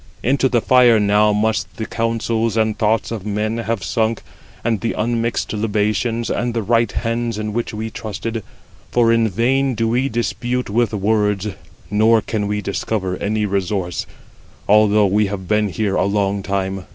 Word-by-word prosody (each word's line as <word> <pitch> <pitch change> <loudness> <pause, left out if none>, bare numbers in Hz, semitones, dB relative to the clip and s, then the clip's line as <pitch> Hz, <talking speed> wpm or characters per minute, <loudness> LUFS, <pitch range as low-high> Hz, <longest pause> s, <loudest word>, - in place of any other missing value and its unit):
Into 135 +1 +2
the 120 -2 +2
fire 125 -3 +5
now 105 +1 +3
must 110 +1 -1
the 110 - -3
counsels 115 -1 -1
and 110 -1 +1
thoughts 110 0 0
of 110 -5 -4
men 105 +2 -2
have 115 -3 -2
sunk, 110 +3 -1 0.4
and 115 -3 0
the 115 - -1
unmixed 115 +1 -1
libations, 110 +2 0
and 120 0 -1
the 115 - 0
right 115 0 +2
hands 115 0 -2
in 105 0 -3
which 120 +1 -2
we 110 +1 -5
trusted; 110 +2 -4 0.5
for 120 -1 +3
in 115 -1 +2
vain 130 +6 +1
do 115 0 0
we 125 +4 +1
dispute 120 0 -2
with 115 0 +2
words, 105 -1 0 0.4
nor 110 +2 +4
can 105 -2 -2
we 105 0 -1
discover 100 -1 -2
any 105 +1 -1
resource, 95 -2 -2 0.6
although 105 0 +5
we 105 +2 +2
have 95 -2 -5
been 105 +1 +2
here 105 +2 -1
for - - +1
a - - +2
long 100 0 0
time. 95 -1 -3
110 Hz, 170 wpm, -19 LUFS, 105-115 Hz, 0.6 s, fire